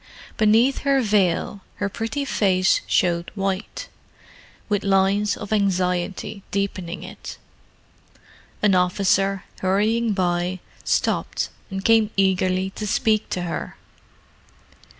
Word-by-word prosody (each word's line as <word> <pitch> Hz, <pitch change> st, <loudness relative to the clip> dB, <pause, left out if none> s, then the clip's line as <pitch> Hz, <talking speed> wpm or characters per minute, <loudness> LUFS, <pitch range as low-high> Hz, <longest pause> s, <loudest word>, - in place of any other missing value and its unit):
Beneath 225 Hz, +5 st, +3 dB
her 275 Hz, -1 st, +2 dB
veil 200 Hz, -2 st, +1 dB
her 205 Hz, -, -2 dB
pretty 225 Hz, +8 st, -3 dB
face 190 Hz, -7 st, +2 dB
showed 170 Hz, -1 st, +1 dB
white, 195 Hz, 0 st, -3 dB, 0.8 s
with 205 Hz, -1 st, 0 dB
lines 195 Hz, +1 st, +2 dB
of 205 Hz, 0 st, -4 dB
anxiety 185 Hz, 0 st, -1 dB
deepening 190 Hz, -3 st, -3 dB
it. -, -, -9 dB, 1.3 s
An 205 Hz, -2 st, +4 dB
officer, 195 Hz, +1 st, +2 dB, 0.2 s
hurrying 215 Hz, +4 st, +1 dB
by, 180 Hz, -1 st, 0 dB, 0.2 s
stopped -, -, 0 dB, 0.2 s
and 195 Hz, 0 st, -5 dB
came 225 Hz, -2 st, +4 dB
eagerly 190 Hz, 0 st, +1 dB
to 210 Hz, +2 st, -5 dB
speak 215 Hz, +1 st, +1 dB
to 180 Hz, -, -2 dB
her. 170 Hz, -, -5 dB
195 Hz, 105 wpm, -23 LUFS, 185-210 Hz, 1.3 s, An